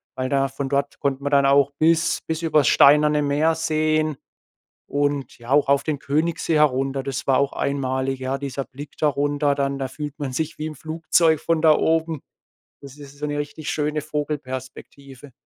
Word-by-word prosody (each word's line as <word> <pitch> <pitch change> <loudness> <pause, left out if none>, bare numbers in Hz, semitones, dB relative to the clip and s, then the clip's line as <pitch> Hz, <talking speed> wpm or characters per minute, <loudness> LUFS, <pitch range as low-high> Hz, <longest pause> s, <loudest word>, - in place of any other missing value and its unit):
Weil 130 0 -3
da 135 -1 +1
von 135 0 -5
dort 140 0 -1
konnten 140 -1 -2
wir - - +1
dann 140 -1 +4
auch 140 0 +4
bis 165 +1 +2
bis 160 0 -3
übers 155 -5 +3
Steinerne 150 +1 +5
Meer 150 +3 +1
sehen, 155 -2 0 0.7
und, 145 -1 -2
ja, 120 +1 -12
auch 145 -1 +3
auf 140 0 +3
den 155 -2 -2
Königssee 160 +2 -1
herunter, 135 -2 +2
das 135 -2 -4
war 130 -1 +3
auch 140 0 0
einmalig, 135 -1 -2
ja. 130 +1 -2
Dieser 135 -1 -5
Blick 140 +2 -10
da 150 - +3
runter 145 0 0
dann, 140 0 -1
da 135 - -2
fühlt 150 +2 -7
man 135 -3 -4
sich 160 +4 -3
wie 155 - -3
im 155 - -7
Flugzeug 160 +1 +1
von 165 -2 0
da 155 -2 +6
oben. 160 -2 0 0.6
Das 140 0 -12
ist 140 -1 -13
so 150 - -3
'ne 145 0 -3
richtig 145 +1 -5
schöne 150 0 -1
Vogelperspektive. 140 -1 -6
145 Hz, 185 wpm, -22 LUFS, 135-155 Hz, 0.7 s, da